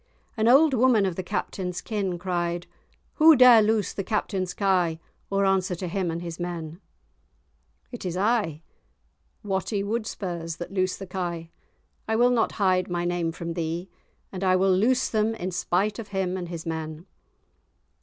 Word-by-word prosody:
An 220 -1 +1
old 280 +4 +6
woman 245 -4 +4
of 185 -3 -2
the 185 - -3
Captain's 180 0 -3
kin 195 -5 -2
cried, 175 -1 -2 0.5
"Who 320 0 +8
dare 250 -3 +8
loose 215 -1 +1
the 195 - -3
Captain's 190 -2 -2
kye, 180 -5 +1 0.3
or 195 0 +1
answer 190 -1 +1
to 180 +1 -5
him 185 0 -1
and 165 +1 -4
his 170 -1 -6
men?" 170 -1 -5 1.1
"It 245 - -7
is 180 -1 -3
I, 200 -7 0 0.8
Watty 200 +1 -1
Wudspurs, 185 -6 -4
that 175 +2 -7
loose 185 -1 0
the 195 - -7
kye; 175 -3 -4 0.6
I 220 - +1
will 245 +2 +4
not 235 -2 +1
hide 185 -3 +1
my 175 0 -1
name 175 -1 -1
from 170 0 -5
thee; 170 +2 -4 0.4
and 190 0 -5
I 185 -1 +4
will 190 0 +3
loose 245 +7 +2
them 220 0 0
in 185 -4 -4
spite 185 +4 0
of 225 - -6
him 190 -2 -2
and 180 -2 -5
his 170 -1 -6
men." 160 0 -5
185 Hz, 165 wpm, -25 LUFS, 175-210 Hz, 1.1 s, Who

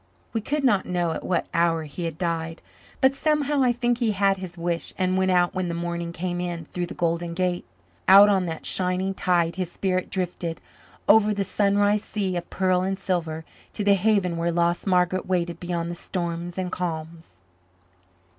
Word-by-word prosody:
We 225 - 0
could 290 +6 -2
not 205 -8 +3
know 175 -2 0
at - - -4
what 180 - 0
hour 165 -1 +2
he 155 +3 -6
had 165 -2 -4
died, 165 -2 -3 0.4
but 265 +1 +5
somehow 295 0 +1
I 250 -2 +4
think 240 0 0
he 225 -4 +1
had 195 0 +2
his 185 -2 -8
wish 170 0 -3
and 185 -1 +1
went 190 0 +2
out 180 -1 +3
when 185 -2 -1
the 170 - -3
morning 170 0 -3
came 175 +1 -3
in 175 -2 -4
through 175 +2 -4
the - - -8
Golden 170 0 -1
Gate. 180 -1 -1 0.4
Out 200 +2 +9
on 190 -3 +2
that 160 -1 -5
shining 185 +1 0
tide 175 -2 +1
his 180 -2 -2
spirit 185 -1 -1
drifted, 175 -3 -3 0.5
over 210 0 +5
the 200 - 0
sunrise 205 +1 +2
sea 195 -4 -2
of 175 - -4
pearl 185 -1 +1
and 190 +1 -1
silver, 165 -4 -2 0.3
to 210 - -3
the 200 0 +5
haven 195 -3 +2
where 170 +1 0
lost 170 +2 0
Margaret 180 0 +2
waited 175 -2 -1
beyond 170 -1 -3
the - - -5
storms 175 0 -4
and 185 -1 -2
calms. 160 - -5
180 Hz, 190 wpm, -25 LUFS, 170-195 Hz, 0.5 s, Out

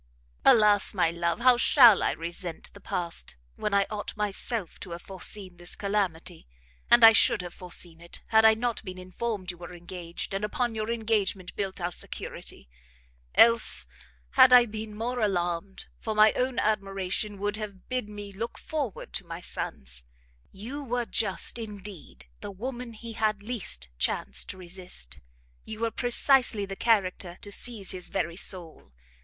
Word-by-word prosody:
"Alas, 210 -2 +5
my 175 -3 +3
love, 170 +4 -1
how 250 0 +6
shall 240 -4 +7
I - - +2
resent 170 0 -6
the - - -13
past, 170 - -3 0.2
when 210 - -2
I 200 0 +3
ought 210 0 -5
myself 210 -1 -2
to 190 - -9
have 170 - -8
foreseen 190 -1 -1
this 175 0 -5
calamity! 190 - -2 0.4
and 240 -1 +7
I 225 0 +11
should 205 - +4
have 175 - -7
foreseen 175 -2 -4
it, 170 - -10
had 220 0 +5
I 220 0 +7
not 235 0 -2
been 185 -3 -7
informed 185 +1 -4
you 175 - -15
were 175 0 -9
engaged, 175 +1 -7
and 195 +1 -2
upon 235 +3 -1
your 215 0 -3
engagement 215 -5 -1
built 195 -2 -3
our 175 0 -2
security. 65 - -6 0.7
Else 230 0 +5 0.5
had 260 -1 +7
I 250 -1 +9
been 215 -1 -7
more 245 +3 -2
alarmed, 180 -2 -1
for 220 -1 -3
my 215 0 +6
own 255 -1 -1
admiration 195 -1 -1
would 205 +1 -2
have 205 -3 -8
bid 255 -5 -2
me 205 -1 -8
look 225 +4 -5
forward 285 -9 -4
to - - -3
my 165 0 -6
son's. 60 - -5 0.4
You 250 +9 -7
were 245 -2 -1
just, 215 +1 0
indeed, 200 - -8
the - - -7
woman 240 +4 -6
he 230 +1 -8
had 215 -2 0
least 195 - -3
chance 65 0 0
to - - -7
resist, 175 - -4 0.4
you 220 0 -8
were 230 0 +1
precisely 245 -2 +3
the 195 0 -6
character 190 -5 +1
to 205 - -9
seize 215 -2 -1
his 185 -1 -4
very 170 - -2
soul. 170 - -4
205 Hz, 165 wpm, -28 LUFS, 180-225 Hz, 0.7 s, I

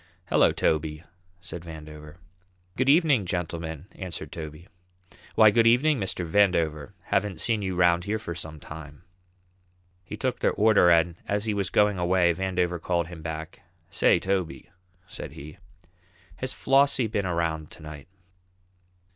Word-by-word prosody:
"Hello, - - +4
Toby!" 75 0 -1 0.4
said 85 -2 -8
Vandover. 75 -2 -10 0.6
"Good 130 +1 +1
evening, 145 - +4
gentlemen," 85 -3 -4
answered 95 -3 -7
Toby. 80 +2 -8 0.7
"Why, 110 -1 +7
good 115 +1 +4
evening, 135 +5 +4
Mr. 95 -2 -2
Vandover; 80 -6 +1
haven't 100 -5 -1
seen 110 +2 +1
you 95 -2 -3
'round 90 0 +3
here 105 +2 -1
for 95 -6 -6
some 80 -2 -7
time." 75 0 -11 1.0
He - - -8
took - - -2
their - - +1
order, 105 -4 +5
and 85 0 +3
as 105 +1 -1
he 110 - 0
was 100 -3 -1
going 105 -2 +2
away, 90 -1 +3
Vandover 90 -1 -1
called 85 -2 -1
him 85 -3 -9
back: 80 0 -6 0.3
"Say, - - +4
Toby," 95 -2 -3 0.3
said 95 - -8
he, 75 +2 -11 0.8
"has 130 0 -3
Flossie 135 -1 +3
been 105 -3 -2
around 85 -3 -2
to 80 - -14
night?" 75 -2 -10
90 Hz, 145 wpm, -26 LUFS, 80-105 Hz, 1.0 s, Why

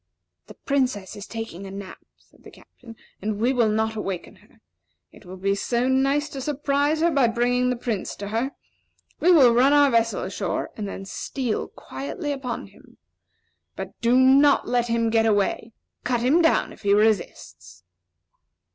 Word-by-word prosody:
"The - - -13
Princess 255 -9 -2
is 205 - -9
taking 225 -4 -7
a - - -8
nap," 195 -1 -9 0.2
said - - -27
the - - -12
Captain, 230 -2 -16 0.3
"and 210 +1 -2
we 245 +4 +2
will 235 -4 +2
not 220 +1 0
awaken 195 -4 -5
her. - - -25 0.5
It - - -18
will 185 +1 -9
be 195 +1 0
so 240 +5 -1
nice 275 +3 +1
to 275 - -7
surprise 290 +2 0
her 340 +1 +3
by 275 -5 +3
bringing 245 +2 +1
the 250 - 0
Prince 235 -4 -4
to 200 0 -7
her. 230 +5 -1 0.7
We 360 - +4
will 265 -9 +6
run 260 +4 +4
our 290 -1 +5
vessel 230 -1 +1
ashore, - - -3
and 210 -2 -5
then 195 0 -7
steal 245 +3 -3
quietly 290 +3 -6
upon 265 -4 -4
him. - - -20 0.8
But - - -6
do 235 +2 +3
not 275 +2 +5
let 240 -1 +1
him 230 -1 0
get 225 0 +3
away. 210 +2 0 0.3
Cut 245 -1 0
him 280 +8 +3
down, 325 - +2
if - - -17
he 200 -1 +3
resists!" 215 0 -1
240 Hz, 175 wpm, -24 LUFS, 215-270 Hz, 0.8 s, will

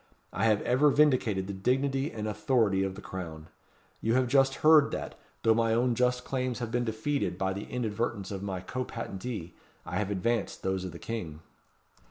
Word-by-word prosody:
I - - 0
have 110 -2 +3
ever 130 +5 +4
vindicated 130 -10 +3
the 100 - -5
dignity 135 +7 0
and 110 -1 -4
authority 105 -2 +2
of 95 -1 -1
the 100 - -10
Crown. 80 -4 -7 0.5
You 115 +2 +1
have 130 -1 +3
just 135 +1 +4
heard 155 -2 +7
that, - - -4 0.3
though 115 - +5
my 115 0 +2
own 120 +1 +2
just 125 +1 +1
claims 130 -2 -2
have 120 -2 -4
been 120 0 0
defeated 110 -1 -1
by 95 0 0
the 100 +2 -5
inadvertence 110 -4 -2
of 95 -1 -4
my 95 -2 -3
co 130 +7 -3
patentee, 105 -5 -6 0.3
I - - -3
have 105 -2 -1
advanced 105 +3 -1
those 95 -1 -1
of 90 - -5
the 85 - -9
King." 85 -8 -5
115 Hz, 190 wpm, -29 LUFS, 95-125 Hz, 0.5 s, heard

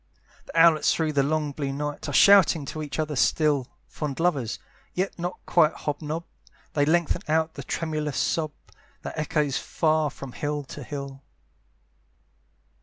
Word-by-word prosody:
The 165 - -1
owlets 165 -2 +5
through 160 -2 0
the 140 - +3
long 150 +1 0
blue 140 -1 -3
night 145 +1 -4
Are - - -3
shouting 185 -2 +6
to 155 +3 -5
each 145 -2 -5
other 155 -1 -1
still: 145 -1 +2 0.2
Fond 150 -2 -5
lovers, 145 -10 0 0.4
yet 185 +2 -1
not 175 +1 -3
quite 160 -3 +4
hob 150 0 -4
nob, 155 +2 -3 0.5
They 145 -1 +2
lengthen 170 +1 +2
out 160 +1 +1
the - - -7
tremulous 155 -4 -3
sob, 155 -2 0 0.5
That - - -6
echoes 150 -3 0
far 155 -2 +1
from 135 -1 -9
hill 145 +2 -3
to 145 +2 -9
hill. 140 0 -7
150 Hz, 155 wpm, -26 LUFS, 145-160 Hz, 0.5 s, shouting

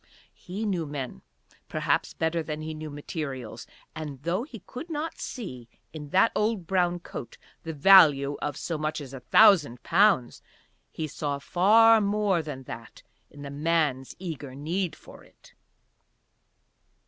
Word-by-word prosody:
He 200 +5 -6
knew 180 -6 -1
men 135 - -6 0.5
perhaps - - 0
better 165 +1 0
than 155 -1 -5
he 160 0 -5
knew 155 0 -7
materials; 140 - -6 0.3
and, 145 -4 -7
though 175 +5 0
he 240 - -10
could 315 +8 -8
not 320 +1 -4
see 125 - -7 0.2
in 150 -2 -8
that 190 +8 +4
old 210 -4 0
brown 175 0 +1
coat 120 - -8 0.2
the 165 - -5
value 145 -4 +6
of 145 -2 -3
so 165 -3 -4
much 155 +1 -2
as 140 -3 -9
a 135 - -7
thousand 150 - +5
pounds, 185 - +3 0.5
he 160 - -4
saw 145 -1 -3
far 215 +9 +5
more 205 -3 +1
than 145 -4 -7
that 115 -2 -10 0.3
in 145 - -12
the 140 - -7
man's 145 -3 0
eager 150 -7 -7
need 170 +5 -2
for - - -15
it. - - -21
160 Hz, 150 wpm, -27 LUFS, 140-190 Hz, 0.5 s, value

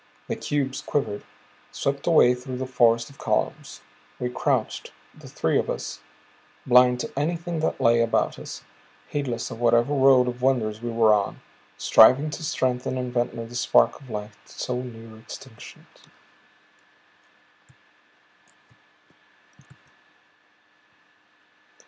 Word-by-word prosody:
The - - -2
cubes 140 -2 -2
quivered 135 -8 -2 0.5
swept 140 0 -3
away 155 -7 +6
through 125 +1 -7
the 130 - -3
forest 120 -2 +2
of 140 - -20
columns. - - -2 0.4
We 125 0 -2
crouched, - - -1 0.2
the - - -14
three - - 0
of - - -3
us, - - -5 0.7
blind 125 0 +5
to - - -6
anything 165 +3 -2
that 160 - -1
lay 115 0 +4
about 115 0 0
us, - - -9 0.5
heedless 130 -5 -3
of 115 - -8
whatever 120 +3 +3
road 135 -2 +5
of 125 0 -4
wonders 115 -5 0
we 120 - -4
were 115 -2 +4
on, 100 -1 -1 0.4
striving 135 +7 +5
to 150 - -6
strengthen 130 -3 -1
in 125 -1 -3
Ventnor 120 -1 -2
the 115 - -12
spark 125 - +2
of 135 - -15
life 105 -1 -7
so 125 +1 -4
near 115 -3 -11
extinction. 115 +1 -12
125 Hz, 120 wpm, -24 LUFS, 115-135 Hz, 0.7 s, away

